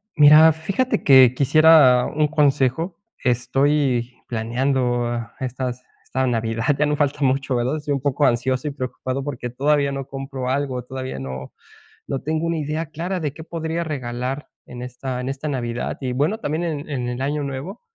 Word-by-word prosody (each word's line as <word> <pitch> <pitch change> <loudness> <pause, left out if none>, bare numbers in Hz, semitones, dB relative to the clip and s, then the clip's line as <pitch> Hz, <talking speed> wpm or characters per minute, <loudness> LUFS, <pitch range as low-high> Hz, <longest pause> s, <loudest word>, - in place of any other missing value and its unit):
Mira, 150 +2 +8
fíjate 195 +11 -1
que 130 -3 +7
quisiera 140 -2 +6
un 150 0 +1
consejo, 150 +3 +1 0.3
estoy 125 0 +1
planeando 120 0 0 0.2
estas 125 -1 -4 0.2
esta 130 0 -1
Navidad 115 -2 -1 0.2
ya 150 - +4
no 150 0 +1
falta 145 -1 0
mucho, 135 0 +1
¿verdad? 125 +5 0
Estoy 150 -1 -2
un 140 - 0
poco 145 +1 +1
ansioso 130 +2 +1
y - - -5
preocupado 130 0 -4
porque 125 -4 -4
todavía 140 +3 +1
no 135 -1 -5
compro 135 -1 -5
algo, 130 -2 -1
todavía 130 - -6
no 65 0 -6 0.6
no 135 - -2
tengo 155 +3 -1
una 165 0 0
idea 155 +2 -2
clara 175 +5 -4
de 150 -3 -2
qué 160 - -10
podría 165 0 -3
regalar 130 -2 -4 0.2
en 125 0 -9
esta 125 +1 -5
en 125 - -4
esta 135 +3 -4
Navidad 120 -4 -3
y 130 -2 -2
bueno, 150 - 0
también 155 -2 -2
en 155 -3 -4
en 125 -3 -2
el 125 +2 -3
Año 145 +2 -1
Nuevo. 140 - -6
135 Hz, 170 wpm, -22 LUFS, 125-150 Hz, 0.6 s, Mira